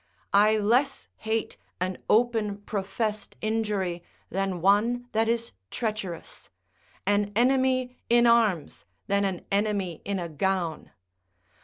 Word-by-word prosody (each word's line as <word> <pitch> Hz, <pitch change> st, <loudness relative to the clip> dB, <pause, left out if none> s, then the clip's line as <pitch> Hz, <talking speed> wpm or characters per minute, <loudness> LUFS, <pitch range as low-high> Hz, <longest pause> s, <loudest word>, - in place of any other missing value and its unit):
I 210 Hz, +2 st, +5 dB
less 245 Hz, +7 st, +1 dB
hate 220 Hz, 0 st, -2 dB, 0.2 s
an 185 Hz, 0 st, -2 dB
open 220 Hz, -3 st, +2 dB
professed 210 Hz, +1 st, -3 dB
injury 210 Hz, -5 st, -1 dB, 0.3 s
than 195 Hz, -1 st, -1 dB
one 220 Hz, +7 st, +2 dB
that 225 Hz, +1 st, +1 dB
is 230 Hz, 0 st, -1 dB, 0.2 s
treacherous; 215 Hz, -7 st, -5 dB, 0.6 s
an 205 Hz, 0 st, +2 dB
enemy 255 Hz, +1 st, +2 dB
in 240 Hz, 0 st, +5 dB
arms, 220 Hz, -10 st, +2 dB, 0.2 s
than 200 Hz, 0 st, +1 dB
an 190 Hz, -3 st, -3 dB
enemy 200 Hz, -4 st, 0 dB
in 200 Hz, -1 st, -2 dB
a 175 Hz, -2 st, -3 dB
gown. 170 Hz, +1 st, -2 dB
210 Hz, 115 wpm, -27 LUFS, 195-230 Hz, 0.6 s, I